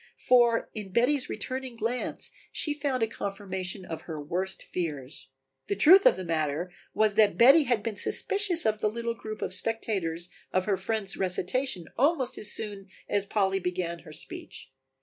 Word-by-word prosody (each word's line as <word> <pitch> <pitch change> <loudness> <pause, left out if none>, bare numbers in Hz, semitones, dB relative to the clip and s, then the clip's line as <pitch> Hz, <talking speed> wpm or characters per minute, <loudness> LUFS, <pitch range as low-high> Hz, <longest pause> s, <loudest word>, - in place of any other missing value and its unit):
For 240 -2 +4
in 205 -3 -6
Betty's 250 +5 +2
returning 260 -1 -4
glance 230 +2 -2 0.2
she 300 - -1
found 280 -4 -1
a - - +2
confirmation 195 -3 -5
of 160 -2 -6
her 155 -2 -4
worst 180 +6 -3
fears. 145 -6 -4 0.4
The 200 - 0
truth 360 - +8
of - - +6
the 185 - -5
matter 160 +1 -1 0.2
was 215 -1 +3
that 210 0 +4
Betty 275 +6 +8
had 240 -5 +1
been 225 -2 -3
suspicious 370 - 0
of 215 -1 +2
the 215 - +2
little 235 +1 -2
group 215 -1 -6
of - - -3
spectators 185 -5 -2 0.2
of 185 0 +1
her 205 - +2
friend's 215 -1 -2
recitation 185 +2 -1
almost 275 -2 +2
as 210 - -2
soon 205 -2 -4 0.2
as 200 -1 0
Polly 195 -2 +1
began 175 -2 -2
her 155 - -13
speech. 145 - -8
205 Hz, 170 wpm, -28 LUFS, 185-240 Hz, 0.4 s, truth